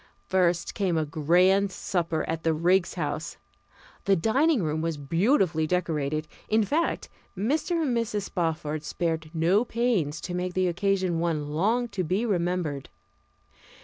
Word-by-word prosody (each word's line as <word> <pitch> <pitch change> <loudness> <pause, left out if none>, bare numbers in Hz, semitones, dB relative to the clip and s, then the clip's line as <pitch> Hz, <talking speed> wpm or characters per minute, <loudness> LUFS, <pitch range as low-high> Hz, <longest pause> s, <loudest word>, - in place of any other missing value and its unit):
First 180 -2 +1
came 185 -5 0
a 155 - +1
grand 180 +6 +3
supper 170 -4 -1
at 160 0 -2
the 165 -1 +1
Riggs 180 +3 +2
House. 155 -1 -3 0.7
The 195 - +4
dining 255 - +2
room 155 0 -1
was 165 -1 -2
beautifully 165 - +2
decorated; 155 -3 -1 0.2
in 220 0 +3
fact, 310 +10 -1 0.3
Mr. 305 - 0
and 260 -5 0
Mrs. 225 -3 -1
Spofford 155 -4 -2
spared 160 0 -2
no 175 +6 +2
pains 225 -12 0
to 175 - -5
make 180 0 -3
the 185 0 +2
occasion 185 -1 0
one 160 -3 -1
long 220 +10 +1
to 200 -3 -2
be 185 +7 0
remembered. 175 - -1
180 Hz, 145 wpm, -27 LUFS, 160-200 Hz, 0.7 s, The